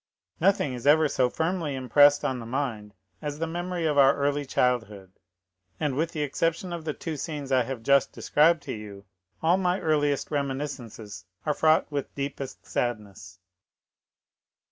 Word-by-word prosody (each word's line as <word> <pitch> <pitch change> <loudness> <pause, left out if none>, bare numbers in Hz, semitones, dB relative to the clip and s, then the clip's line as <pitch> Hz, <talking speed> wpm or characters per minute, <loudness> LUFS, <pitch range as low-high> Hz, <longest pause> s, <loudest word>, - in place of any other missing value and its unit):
"Nothing 175 -6 +2
is 125 +2 -5
ever 155 +1 +6
so 130 -3 +1
firmly 160 -1 -2
impressed 145 +3 +4
on 130 -1 -1
the 115 - -7
mind 115 -6 -3 0.3
as 150 -1 -4
the 165 - -1
memory 175 +1 -3
of 150 -2 +2
our 135 0 +6
early 145 0 -1
childhood, 115 -8 -1 0.7
and 145 -3 0
with 160 +4 0
the 150 -2 -2
exception 165 +5 -1
of 170 -2 -6
the 155 - -2
two 165 -2 -5
scenes 145 -2 -5
I 130 -1 +4
have 125 -2 -6
just 140 +2 +3
described 160 +1 +2
to 130 - -5
you, 100 -3 -9 0.4
all 170 +3 +4
my 180 0 0
earliest 145 -3 0
reminiscences 130 - -4 0.2
are 150 - +1
fraught 155 +1 +3
with 140 -2 -4
deepest 140 -1 -5
sadness." 105 -6 -4
145 Hz, 160 wpm, -26 LUFS, 125-155 Hz, 0.7 s, ever